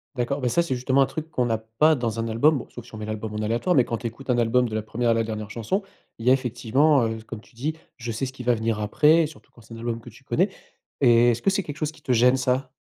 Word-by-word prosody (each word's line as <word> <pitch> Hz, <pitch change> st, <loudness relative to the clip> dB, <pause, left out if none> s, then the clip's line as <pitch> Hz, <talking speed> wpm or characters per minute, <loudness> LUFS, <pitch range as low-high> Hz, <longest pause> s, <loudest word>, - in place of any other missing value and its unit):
D'accord, 125 Hz, +3 st, -1 dB
bah, 125 Hz, -, -1 dB
ça, 125 Hz, +8 st, +2 dB
c'est 140 Hz, -6 st, -1 dB
justement 130 Hz, +2 st, +2 dB
un -, -, +5 dB
truc 160 Hz, +2 st, -6 dB
qu'on 125 Hz, -6 st, 0 dB
a 115 Hz, -, +1 dB
pas 115 Hz, +8 st, +2 dB
dans 115 Hz, -5 st, -2 dB
un 115 Hz, -, -2 dB
album, 145 Hz, +7 st, +3 dB
bon 125 Hz, -, -7 dB
sauf, 120 Hz, -1 st, -10 dB
si 120 Hz, -, -12 dB
on -, -, -7 dB
met 105 Hz, -, -5 dB
l'album 110 Hz, 0 st, -5 dB
en 105 Hz, -, -3 dB
aléatoire. 120 Hz, +12 st, +1 dB
Mais, 130 Hz, -, +6 dB
quand 115 Hz, -, -3 dB
tu 120 Hz, -, -4 dB
écoutes 125 Hz, +4 st, -11 dB
un 125 Hz, -, +3 dB
album 120 Hz, +1 st, +2 dB
de 110 Hz, -, -8 dB
la 110 Hz, -, 0 dB
1re 115 Hz, +2 st, -1 dB
à -, -, +5 dB
la 115 Hz, 0 st, +1 dB
dernière 110 Hz, -1 st, -5 dB
chanson, 120 Hz, -, -2 dB, 0.4 s
il 115 Hz, -, -7 dB
y -, -, +5 dB
a 130 Hz, -, +7 dB
effectivement, 130 Hz, +2 st, +2 dB
heu, 115 Hz, 0 st, -2 dB
comme 115 Hz, -2 st, -7 dB
tu -, -, -23 dB
dis, 145 Hz, +7 st, -3 dB, 0.2 s
je 115 Hz, -1 st, -5 dB
sais 125 Hz, +5 st, -2 dB
ce 130 Hz, -, -5 dB
qui 130 Hz, -1 st, -9 dB
va 120 Hz, 0 st, +3 dB
venir 110 Hz, -1 st, -1 dB
après 150 Hz, +10 st, +4 dB
surtout 155 Hz, -, -16 dB
quand 115 Hz, -, -18 dB
c'est 115 Hz, +1 st, -14 dB
un -, -, -8 dB
album 115 Hz, 0 st, -3 dB
que 120 Hz, -, -12 dB
tu 120 Hz, +5 st, -18 dB
connais 185 Hz, +8 st, +1 dB, 0.5 s
et 120 Hz, -2 st, +6 dB
est-ce 120 Hz, 0 st, -3 dB
que -, -, +2 dB
c'est 195 Hz, +1 st, +1 dB
quelque 145 Hz, -, -7 dB
chose 155 Hz, -1 st, -2 dB
qui 155 Hz, 0 st, -19 dB
te 130 Hz, -, 0 dB
gêne 125 Hz, +2 st, +4 dB
ça? 130 Hz, +1 st, 0 dB
120 Hz, 315 wpm, -24 LUFS, 115-135 Hz, 0.5 s, a